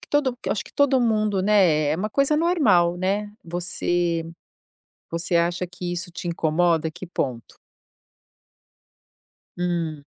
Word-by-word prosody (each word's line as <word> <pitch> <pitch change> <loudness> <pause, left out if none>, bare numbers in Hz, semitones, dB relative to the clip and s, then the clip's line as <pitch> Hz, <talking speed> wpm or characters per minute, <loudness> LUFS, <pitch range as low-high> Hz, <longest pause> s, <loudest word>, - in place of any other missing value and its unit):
que - - -15
todo 280 -4 +1
acho - - -1
que - - -15
todo 280 -2 +3
mundo, 215 -4 +1
né? 185 -7 +3
É 155 - 0
uma 210 +5 -3
coisa 275 +5 +2
normal, 225 - +3
né? 200 +3 -1
Você 175 0 -1 0.9
você 170 +1 -1
acha 170 +2 +1
que 180 0 -6
isso 175 0 -4
te 175 +1 -6
incomoda? 165 -1 +1
Que 185 - -9
ponto? 130 -9 -4 2.0
Hum. 170 -4 -2
175 Hz, 130 wpm, -23 LUFS, 170-210 Hz, 2.0 s, todo